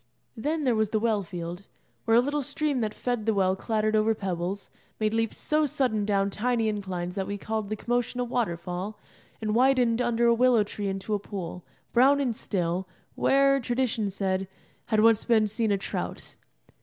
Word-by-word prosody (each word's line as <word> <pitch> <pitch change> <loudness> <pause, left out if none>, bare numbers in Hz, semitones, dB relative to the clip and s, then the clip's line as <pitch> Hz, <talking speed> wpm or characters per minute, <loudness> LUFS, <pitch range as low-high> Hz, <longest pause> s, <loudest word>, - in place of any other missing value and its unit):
Then 300 +7 -1
there 255 -3 +3
was 220 -2 +1
the 220 - +1
well 220 -2 +1
field, 175 +1 -7 0.4
where 225 -1 +5
a - - +7
little 290 +3 -1
stream 290 0 -1
that 215 -2 -1
fed 245 -3 -2
the 220 - +3
well 190 -1 +2
clattered 215 +1 0
over 215 +1 +3
pebbles, 190 0 -4 0.3
made 215 0 +1
leaps 225 -1 0
so 305 0 +1
sudden 245 -6 0
down 200 -1 +1
tiny 230 +1 0
inclines 185 -4 -3
that 190 0 -3
we 205 - -3
called 215 0 -3
the 215 - -1
commotion 245 +2 -1
a - - +2
waterfall, 185 -4 -3 0.4
and 215 -1 -1
widened 250 -1 +3
under 240 -1 +1
a 235 - +6
willow 240 -2 +4
tree 205 0 -5
into 195 +2 -3
a 205 - +1
pool, 180 -3 -6 0.3
brown 270 +4 +5
and 250 -5 0
still, 180 -1 -2 0.3
where, 275 0 +3
tradition 240 -4 -1
said, 190 -1 -1 0.4
had 215 -1 +3
once 225 -1 +5
been 225 -3 +3
seen 215 +1 -1
a 200 - +3
trout. 195 - -5
220 Hz, 185 wpm, -27 LUFS, 195-245 Hz, 0.4 s, a